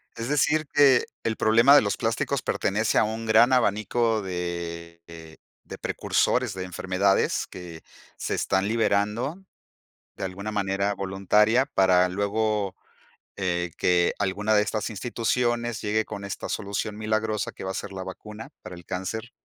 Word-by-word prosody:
¿Es 115 +2 -5
decir, 150 +1 +2
que 140 -4 +5 0.2
el 110 -1 -1
problema 115 +6 +6
de - - +8
los 100 - -1
plásticos 120 +4 -1
pertenece 105 +3 0
a - - +5
un 110 +1 -3
gran 115 +4 +5
abanico 115 0 +1
de 85 -2 -5 0.7
de - - -7
precursores 125 -5 0
de 95 - -5
enfermedades 95 +2 0
que 85 -3 -10 0.3
se - - -3
están 95 +2 0
liberando 115 - 0 0.7
de - - -7
alguna 95 +3 -5
manera 100 -1 0
voluntaria 105 +6 +2
para 90 -1 +3
luego, 100 +1 -1 0.6
eh, 90 -3 -1
que 90 -1 +2
alguna 105 +2 0
de 105 - +5
estas 105 0 -2
instituciones 120 +1 -1
llegue 110 +1 0
con 100 -1 -7
esta 100 - -5
solución 105 +1 -3
milagrosa 110 0 -1
que - - -9
va 95 - -3
a - - -6
ser 95 - -5
la 95 -1 -5
vacuna 105 +4 -9
para 90 - -8
el 85 - -12
cáncer 110 +8 -5
105 Hz, 150 wpm, -25 LUFS, 95-115 Hz, 0.7 s, de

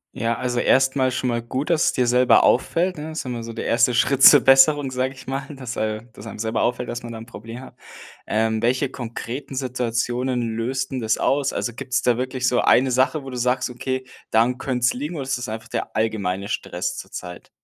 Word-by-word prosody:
Ja, 115 +1 -1
also 125 -1 -1
erst 130 +2 +3
mal 130 -1 +3
schon 125 0 -2
mal 115 0 -1
gut, 130 +6 -4
dass 165 -2 +3
es - - +2
dir 125 - +1
selber 125 +1 +4
auffällt, 175 +8 +2
ne? 155 +2 -6
Ist 160 - -4
immer 120 -2 -4
so 115 0 -7
der - - -5
1. 115 +1 +3
Schritt 135 +2 +2
zur 145 -3 +10
Besserung, 135 +1 +5
sage 130 +1 -1
ich - - -13
mal, 135 +1 -3
dass, 125 -2 -7
äh 110 0 -2
dass 110 0 -12
einem - - -8
selber 110 +1 -1
auffällt, 125 0 -1
dass 120 - -4
man 120 -1 -8
da - - -7
'n 110 - -9
Problem 115 +1 -9
hat. 130 - -13 0.5
Ähm, 110 0 0
welche 130 +3 +1
konkreten 130 +2 -6
Situationen 125 0 -1 0.2
löst'n 130 +2 -2
das 110 -1 0
aus? 140 0 +1
Also 120 - -2
gibt 130 +1 -2
da 120 -1 +3
wirklich 130 0 -2
so 125 - +1
eine 130 +1 +4
Sache, 130 +4 +1
wo 135 - -8
du 125 - -6
sagst: 125 +1 0
„Okay, 130 +1 -3 0.3
daran 120 +3 +3
könnt's 125 -1 0
liegen? 150 +7 -5
Oder 140 - -3
ist 130 -1 -2
das 125 - -5
einfach 110 +1 -7
der - - -4
allgemeine 100 -3 -1
Stress - - -3
zurzeit?“ - - -8
125 Hz, 220 wpm, -22 LUFS, 115-135 Hz, 0.5 s, zur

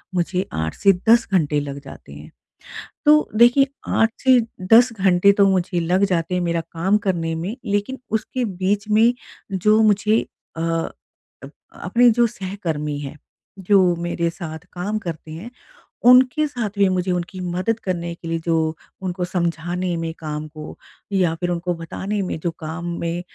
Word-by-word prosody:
मुझे 180 +2 0
8 80 0 -2
से 195 -1 +4 0.2
10 230 0 +5
घंटे 150 -5 +2
लग 140 -1 -5
जाते 135 - -12
हैं। 75 +2 -12 0.7
तो 300 +1 +5
देखिए 240 +5 +5 0.3
8 225 0 +3
से 260 -2 +6 0.3
10 240 +2 +7
घंटे 190 -1 +4
तो 200 - +6
मुझे 180 -2 +1
लग 180 +4 +1
जाते 175 -2 -1
हैं 180 - 0
मेरा 170 -1 0
काम 185 +5 +1
करने 175 -5 -2
में, 175 +7 -4
लेकिन 205 +6 -2
उसके 240 +3 -2
बीच 200 +1 -1
में 225 +3 +4 0.4
जो 210 +4 +3
मुझे 215 +1 +3 0.4
अ - - -3
अ, 165 0 -6 0.4
अपने 245 0 +4
जो 235 +1 +3
सहकर्मी 180 -9 -4
हैं, 145 +1 -7 0.4
जो 185 -2 +3
मेरे 170 0 -2
साथ 160 -1 -7
काम 200 +4 -3
करते 160 -5 -7
हैं 185 +10 -8 0.6
उनके 255 +5 +6
साथ 240 -7 -3
भी 200 -1 +5
मुझे 185 0 -1
उनकी 180 +2 -4
मदद 185 +5 -1
करने 170 -2 -3
के 170 0 -10
लिए 165 0 -1
जो 165 -1 +1 0.5
उनको 180 -1 -3
समझाने 175 0 -2
में 165 0 -3
काम 150 -1 -5
को, 155 0 -10 0.4
या 180 -4 +2
फिर 175 +1 -2
उनको 175 0 -2
बताने 190 +5 -4
में 180 - -3
जो 170 - -1
काम 160 +2 -5
में 170 +1 -2
180 Hz, 165 wpm, -21 LUFS, 165-210 Hz, 0.7 s, 10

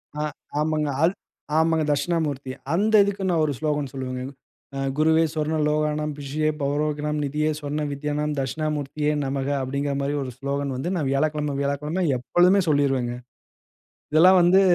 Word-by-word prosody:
அ. 150 - -2 0.4
ஆமாங்க. 155 -1 0
அல் 170 +3 +4 0.4
ஆமாங்க 160 0 +3
தக்ஷிணாமூர்த்திய. 145 -3 -1 0.2
அந்த 210 +5 +1
இதுக்கு 200 -1 -2
நான் 165 -3 +2
ஒரு 145 - -1
ஸ்லோகன் 150 -3 -1
சொல்லுவேங்க. 130 -1 -4 0.6
அ - - -3 0.2
"குருவே 160 +1 +4
சொர்ண 155 0 -1
லோகாணம். 150 0 0
பிஷியே 145 +2 -1
பௌரோகினம் 150 +1 -1
நிதியே 150 +2 0
சொர்ண 150 +1 -2
வித்யானம் 150 +1 -2
தக்ஷிணாமூர்த்தியே 150 +1 -1
நமஹ." 135 0 -2
அப்பிடிங்குற 140 +2 -2
மாரி 140 +1 -1
ஒரு 130 - -6
ஸ்லோகன் 140 0 -2
வந்து, 160 +8 -2
நான் 150 -5 -1
வியாழக்கிழம, 150 0 0
வியாழக்கிழம 150 +6 -1
எப்பொழுதுமே 180 +10 +3
சொல்லிருவேங்க. 135 -4 +1 1.0
இதெல்லாம் 180 +4 +7
வந்து 180 +3 +6
150 Hz, 140 wpm, -24 LUFS, 140-155 Hz, 1.0 s, இதெல்லாம்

